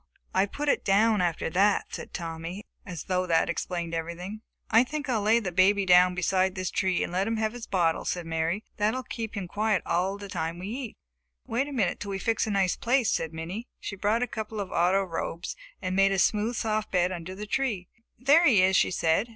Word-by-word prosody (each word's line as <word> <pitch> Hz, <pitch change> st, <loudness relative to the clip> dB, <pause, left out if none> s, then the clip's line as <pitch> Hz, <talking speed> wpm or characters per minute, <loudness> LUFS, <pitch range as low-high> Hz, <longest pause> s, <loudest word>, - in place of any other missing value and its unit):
"I 190 Hz, +2 st, +3 dB
put 295 Hz, +8 st, -5 dB
it -, -, +2 dB
down 210 Hz, +1 st, +3 dB
after 170 Hz, -2 st, 0 dB
that," 200 Hz, +4 st, +2 dB
said -, -, -6 dB
Tommy 165 Hz, +3 st, -5 dB, 0.2 s
as 175 Hz, -5 st, -6 dB
though 185 Hz, -1 st, -1 dB
that 165 Hz, 0 st, +2 dB
explained 170 Hz, -1 st, -4 dB
everything. 170 Hz, +6 st, -5 dB, 0.3 s
"I 225 Hz, +2 st, +7 dB
think 295 Hz, +3 st, -5 dB
I 250 Hz, -3 st, +1 dB
will -, -, -1 dB
lay 220 Hz, +3 st, +4 dB
the 195 Hz, -6 st, -4 dB
baby 195 Hz, +3 st, +4 dB
down 180 Hz, 0 st, +6 dB
beside 185 Hz, +1 st, +1 dB
this 185 Hz, -1 st, -3 dB
tree 185 Hz, -2 st, +1 dB
and -, -, -5 dB
let 190 Hz, +3 st, +1 dB
him 225 Hz, 0 st, -1 dB
have 220 Hz, 0 st, -1 dB
his 245 Hz, -2 st, -8 dB
bottle," 170 Hz, -4 st, +1 dB
said 175 Hz, -2 st, -3 dB
Mary. 165 Hz, +5 st, -1 dB
"That 210 Hz, +3 st, +1 dB
will 260 Hz, -, -3 dB
keep 225 Hz, -3 st, -5 dB
him 190 Hz, -3 st, -3 dB
quiet 210 Hz, 0 st, 0 dB
all 190 Hz, +3 st, 0 dB
the 200 Hz, 0 st, -8 dB
time 165 Hz, -2 st, -3 dB
we 185 Hz, +3 st, -6 dB
eat." 245 Hz, 0 st, -6 dB, 0.5 s
"Wait 250 Hz, +5 st, -1 dB
a -, -, -7 dB
minute 225 Hz, -9 st, 0 dB
until 200 Hz, -, -6 dB
we 195 Hz, -, -2 dB
fix 225 Hz, +3 st, 0 dB
a -, -, -1 dB
nice 195 Hz, -3 st, +2 dB
place," 245 Hz, -2 st, +2 dB
said 160 Hz, -, -1 dB
Minnie. 175 Hz, +9 st, -6 dB
She 205 Hz, -, -5 dB
brought 210 Hz, +5 st, +1 dB
a -, -, -1 dB
couple 220 Hz, -1 st, -5 dB
of 200 Hz, -, -4 dB
auto 185 Hz, +3 st, +3 dB
robes 170 Hz, -1 st, -4 dB, 0.3 s
and 185 Hz, -, -1 dB
made 195 Hz, 0 st, +4 dB
a 195 Hz, -, +1 dB
smooth, 215 Hz, +5 st, +2 dB
soft 215 Hz, -1 st, -1 dB
bed 180 Hz, -1 st, +2 dB
under 180 Hz, +1 st, -6 dB
the 210 Hz, +2 st, -6 dB
tree. 210 Hz, -5 st, -1 dB, 0.3 s
"There 290 Hz, +7 st, +5 dB
he 210 Hz, -9 st, +5 dB
is!" 190 Hz, +1 st, +4 dB
she -, -, +4 dB
said. 175 Hz, +5 st, +1 dB
195 Hz, 230 wpm, -27 LUFS, 180-220 Hz, 0.5 s, I